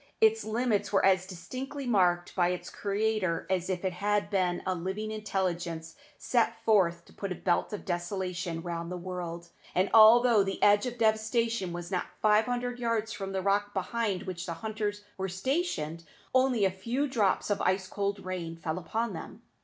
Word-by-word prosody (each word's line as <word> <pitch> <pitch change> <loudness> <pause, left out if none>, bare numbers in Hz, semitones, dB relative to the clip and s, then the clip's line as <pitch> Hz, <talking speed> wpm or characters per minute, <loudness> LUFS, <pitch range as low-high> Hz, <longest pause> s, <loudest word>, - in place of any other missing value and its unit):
Its 445 0 +4
limits 220 -2 0
were 195 - +3
as 185 -1 +3
distinctly 255 +10 -6
marked 180 -6 +2
by 175 -2 +3
its 180 0 -4
Creator 200 -4 -1
as 185 -1 0
if 185 0 -2
it 185 - 0
had 205 +2 0
been 180 -3 +1
a 185 - +1
living 190 +5 -3
intelligence 175 -6 -3 0.2
sent 240 -2 +1
forth 175 -6 +3
to - - -19
put 200 -2 -5
a - - -1
belt 175 -1 0
of 210 - -6
desolation 175 -2 -3
round 170 -1 -4
the 180 - -3
world; 175 -1 -6 0.3
and, 185 +2 +2
although 225 0 +8
the 195 -1 -1
edge 205 +3 +5
of 245 -1 -5
devastation 220 -2 +1
was 175 +1 -6
not 180 - -1
five 215 0 +4
hundred 245 0 -2
yards 230 -2 -1
from 195 -2 -5
the 190 -1 -2
rock 205 +1 +1
behind 195 0 -1
which 185 -1 -5
the 170 - -3
hunters 210 +1 -3 0.2
were 190 0 -1
stationed, 185 - -2 0.3
only 255 -5 +3
a 190 - +2
few 235 +10 -2
drops 215 -6 +1
of 205 - 0
ice 185 +1 +1
cold 200 0 -3
rain 175 -3 -4
fell 165 +1 -3
upon 220 +6 -2
them. 205 +6 -9
195 Hz, 180 wpm, -29 LUFS, 180-220 Hz, 0.3 s, although